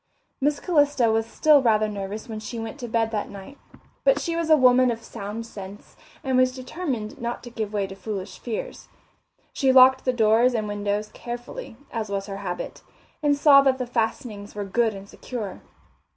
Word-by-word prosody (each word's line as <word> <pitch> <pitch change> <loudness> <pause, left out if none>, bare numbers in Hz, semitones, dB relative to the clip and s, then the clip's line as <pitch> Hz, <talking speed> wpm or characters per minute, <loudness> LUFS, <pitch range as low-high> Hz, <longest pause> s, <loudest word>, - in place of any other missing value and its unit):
Miss 290 +1 +1
Calista 290 -8 +3
was 225 0 +1
still 295 +4 +4
rather 215 -3 +3
nervous 205 +2 -5
when 220 -2 -5
she 220 +2 -7
went 225 +4 -6
to 245 - -5
bed 225 -1 0
that 210 -2 -2
night, 200 +8 -11 0.4
but - - +4
she 335 -2 -2
was 335 -1 -1
a 310 - +7
woman 255 -1 +5
of 230 -1 -3
sound 210 +3 -6
sense 200 -2 -10 0.3
and 265 -1 0
was 255 0 +3
determined 255 -5 -5
not 235 0 -4
to 240 - -9
give 220 -3 -4
way 205 -2 0
to 195 - -8
foolish 195 0 -6
fears. 230 -3 -5 0.7
She 270 -2 +2
locked 260 0 +7
doors 230 +2 +4
and 215 -2 -1
windows 205 0 -2
carefully, 240 - -7
as 220 -3 -3
was 195 -1 -2
her 195 -1 -6
habit, 180 -3 -5 0.4
and 290 -1 +2
saw 280 -1 +7
that 270 -1 +2
the 255 - -3
fastenings 225 -3 -3
were 205 -1 -3
good 220 +2 +1
and 195 0 -10
secure. 215 -3 -7
230 Hz, 185 wpm, -24 LUFS, 210-260 Hz, 0.7 s, a